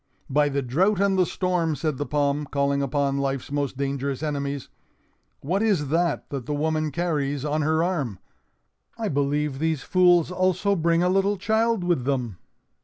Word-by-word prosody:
"By 145 +1 +3
the 140 0 -1
drought 180 - +1
and 200 -1 +2
the 185 -2 +3
storm!" 175 -4 0
said 155 -3 -2
the 145 - -2
palm, 145 0 0
calling 140 0 0
upon 140 0 0
Life's 135 -1 -2
most 140 -2 -2
dangerous 140 0 -2
enemies. 140 -2 -3 0.7
"What 180 +8 -1
is 190 -11 +1
that 170 +1 0
that 135 -4 -5
the 150 - -1
woman 155 +1 0
carries 145 -3 -1
on 150 +1 0
her 160 +2 +2
arm? 150 - -2 0.8
I 225 -3 -2
believe 145 0 0
these 160 -3 -1
fools 180 -2 +4
also 185 +2 +1
bring 170 0 +2
a - - +3
little 195 +2 +2
child 220 +1 +1
with 175 -8 0
them!" 125 -8 -1
150 Hz, 170 wpm, -24 LUFS, 140-180 Hz, 0.8 s, fools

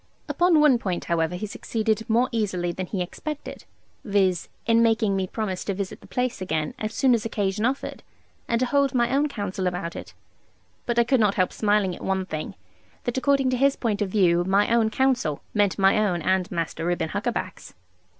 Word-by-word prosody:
Upon 350 -3 +3
one 290 -5 +5
point, 185 -5 -3
however, 165 0 0
he 180 - -4
succeeded 220 +2 -2
more 235 +3 +3
easily 190 -6 -1
than 185 +1 -5
he 185 -2 -2
expected, 300 - -7 0.4
viz. 195 -4 +1 0.2
in 230 0 +4
making 220 -3 +2
me 190 -1 -1
promise 190 -3 -3
to 200 - -2
visit 195 -1 -5
the - - -15
place 250 -5 -2
again, 160 -4 -2
as 215 0 -3
soon 260 +2 +3
as 230 - +1
occasion 210 -1 -1
offered, 265 +3 -2 0.5
and 235 - +1
to - - +3
hold 280 0 +1
my 240 +1 +2
own 295 +2 +2
counsel 195 -6 -3
about 180 -1 -3
it. - - -9 0.7
But 240 -1 -1
I 235 - +6
could 250 +2 +2
not 210 -2 +3
help 185 -1 +1
smiling 205 -4 +1
at - - -11
one 190 -1 -1
thing, 155 -4 -5 0.5
that 245 +1 -1
according 275 -1 +2
to 255 - 0
his 275 +2 +3
point 215 -4 -2
of 205 - 0
view 175 -4 +3
my 200 +5 +2
own 230 -2 +3
counsel 245 - 0
meant 205 -2 +2
my 195 +1 +4
own 175 -5 -1
and 185 0 +1
Master 165 -1 -3
Reuben 175 -1 -1
Huckaback's. - - -4
210 Hz, 200 wpm, -25 LUFS, 185-240 Hz, 0.7 s, I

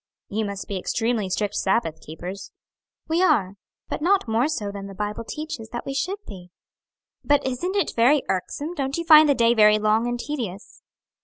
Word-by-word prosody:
"You 215 +2 -1
must 200 -1 -5
be 195 -2 -3
extremely 225 0 -1
strict 205 +2 -1
Sabbath 190 -7 0
keepers." 180 +5 -8 0.6
"We 325 +3 +1
are, 200 - +3 0.3
but - - -4
not 375 -3 +2
more 225 +4 +2
so 210 -10 -3
than 200 -1 -7
the 195 - -10
Bible 210 +3 -4
teaches 300 -3 -6
that 240 +1 -6
we 275 - -4
should 370 +9 -2
be." 180 -2 -11 0.7
"But 290 0 +2
isn't 305 +10 -2
it 400 - 0
very 260 +5 +4
irksome? 285 - -3
don't 275 -3 -2
you 335 - -2
find 310 -2 +8
the 285 - +4
day 235 -1 +4
very 210 -2 +6
long 215 +2 +2
and 240 0 -2
tedious?" 230 -10 -6
230 Hz, 185 wpm, -24 LUFS, 200-290 Hz, 0.7 s, find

